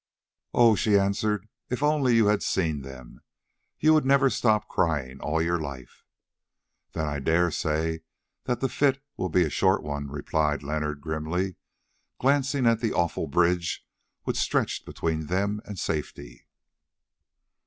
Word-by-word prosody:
"Oh!" 115 Hz, -2 st, +6 dB
she 105 Hz, 0 st, +3 dB
answered, 100 Hz, +1 st, 0 dB, 0.2 s
"if 125 Hz, +3 st, -2 dB
only 145 Hz, -5 st, +3 dB
you 115 Hz, -2 st, +5 dB
had 105 Hz, 0 st, +2 dB
seen 80 Hz, -6 st, 0 dB
them, 65 Hz, -2 st, -11 dB, 0.6 s
you 155 Hz, +1 st, +5 dB
would 155 Hz, -, +4 dB
never 135 Hz, 0 st, +4 dB
stop 110 Hz, -3 st, +2 dB
crying 75 Hz, -8 st, -1 dB
all 80 Hz, +2 st, 0 dB
your 85 Hz, +1 st, 0 dB
life." 70 Hz, -4 st, -9 dB, 0.9 s
"Then 80 Hz, -, -2 dB
I 75 Hz, -1 st, -2 dB
dare 80 Hz, +5 st, +2 dB
say 80 Hz, +2 st, -1 dB, 0.5 s
that 125 Hz, -2 st, -1 dB
the 135 Hz, -, +2 dB
fit 135 Hz, +1 st, +1 dB, 0.2 s
will 95 Hz, -, -2 dB
be 90 Hz, +2 st, +3 dB
a 80 Hz, -, -1 dB
short -, -, +2 dB
one," 70 Hz, -1 st, -4 dB
replied 75 Hz, 0 st, -1 dB
Leonard 75 Hz, 0 st, -3 dB
grimly, 80 Hz, +4 st, -2 dB, 0.6 s
glancing 135 Hz, 0 st, +1 dB
at 115 Hz, -1 st, +4 dB
the 115 Hz, -2 st, -1 dB
awful 85 Hz, -1 st, 0 dB
bridge 85 Hz, +3 st, +1 dB, 0.4 s
which -, -, -2 dB
stretched -, -, 0 dB
between 80 Hz, -2 st, -2 dB
them 100 Hz, +4 st, -1 dB
and 100 Hz, -, -7 dB
safety. 75 Hz, -2 st, -5 dB
90 Hz, 145 wpm, -26 LUFS, 75-115 Hz, 0.9 s, Oh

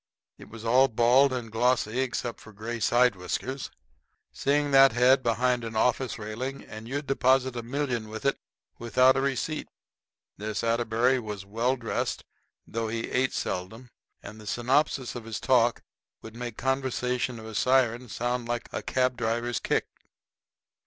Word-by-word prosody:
It -, -, -13 dB
was 115 Hz, 0 st, -10 dB
all 130 Hz, +4 st, +5 dB
bald 125 Hz, +3 st, +4 dB
and 120 Hz, -3 st, -4 dB
glossy 120 Hz, 0 st, +1 dB
except 125 Hz, -2 st, -2 dB
for 110 Hz, -, -13 dB
gray 110 Hz, +3 st, -5 dB
side 120 Hz, 0 st, +3 dB
whiskers. 130 Hz, +9 st, -4 dB, 0.6 s
Seeing 145 Hz, +1 st, +1 dB
that 135 Hz, -2 st, +7 dB
head 125 Hz, +3 st, +5 dB
behind 125 Hz, +1 st, +1 dB
an 115 Hz, -1 st, -6 dB
office 125 Hz, +3 st, +1 dB
railing, 120 Hz, +6 st, -5 dB
and 110 Hz, +1 st, -10 dB
you'd 145 Hz, +4 st, -3 dB
deposit 130 Hz, -1 st, +2 dB
a 120 Hz, -, -3 dB
million 120 Hz, -3 st, -2 dB
with 110 Hz, +2 st, -7 dB
it 140 Hz, -, +1 dB, 0.4 s
without 130 Hz, +3 st, +4 dB
a 135 Hz, -, +1 dB
receipt. 140 Hz, +3 st, -2 dB, 0.7 s
This 105 Hz, +1 st, -3 dB
Atterbury 115 Hz, +2 st, +2 dB
was 105 Hz, -4 st, -6 dB
well 115 Hz, +6 st, 0 dB
dressed, 120 Hz, -3 st, -3 dB, 0.4 s
though 115 Hz, 0 st, -3 dB
he 115 Hz, +1 st, -3 dB
ate 130 Hz, +1 st, +1 dB
seldom; 110 Hz, +7 st, -4 dB, 0.3 s
and 105 Hz, +2 st, -10 dB
the 105 Hz, -, -12 dB
synopsis 130 Hz, +2 st, +1 dB
of 120 Hz, -2 st, -7 dB
his 115 Hz, -2 st, -4 dB
talk 120 Hz, -3 st, +2 dB, 0.4 s
would 110 Hz, 0 st, -10 dB
make 120 Hz, -2 st, -6 dB
the -, -, -9 dB
conversation 125 Hz, -2 st, -1 dB
of 110 Hz, -, -10 dB
a 110 Hz, -, -8 dB
siren 125 Hz, 0 st, +2 dB
sound 120 Hz, +2 st, -2 dB
like 120 Hz, 0 st, -3 dB
a -, -, -2 dB
cab 130 Hz, -1 st, 0 dB
driver's 120 Hz, 0 st, -1 dB
kick. -, -, 0 dB
120 Hz, 160 wpm, -27 LUFS, 115-130 Hz, 0.7 s, that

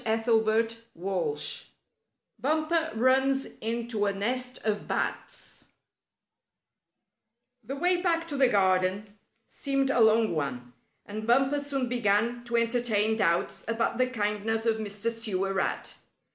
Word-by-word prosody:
STORY 225 Hz, 0 st, +2 dB, 0.3 s
VIII 175 Hz, -4 st, -2 dB, 1.0 s
BUMPER 315 Hz, +3 st, 0 dB
RUNS 265 Hz, +3 st, +3 dB, 0.2 s
INTO 230 Hz, -2 st, -1 dB
A -, -, +2 dB
NEST 250 Hz, +6 st, -3 dB
OF 210 Hz, -1 st, -1 dB
BATS -, -, -4 dB, 2.0 s
The 265 Hz, +6 st, -5 dB
way 355 Hz, +4 st, +2 dB
back 335 Hz, -2 st, +1 dB
to 290 Hz, -, -4 dB
the 270 Hz, -2 st, +4 dB
garden 195 Hz, 0 st, +1 dB, 0.3 s
seemed 275 Hz, -1 st, 0 dB
a 250 Hz, -, +1 dB
long 220 Hz, -1 st, +4 dB
one, 125 Hz, -5 st, -4 dB, 0.3 s
and 215 Hz, +2 st, -6 dB
Bumper 270 Hz, +4 st, +3 dB
soon 280 Hz, -3 st, -2 dB
began 235 Hz, 0 st, +1 dB
to 235 Hz, 0 st, 0 dB
entertain 230 Hz, -2 st, +1 dB
doubts 175 Hz, -6 st, 0 dB
about 230 Hz, +1 st, -1 dB
the 255 Hz, -, +3 dB
kindness 220 Hz, -1 st, -1 dB
of 225 Hz, -1 st, +2 dB
Mr. 210 Hz, +1 st, -3 dB
Sewer 195 Hz, -4 st, -2 dB
Rat. 195 Hz, -, -2 dB
225 Hz, 120 wpm, -28 LUFS, 205-255 Hz, 2.0 s, the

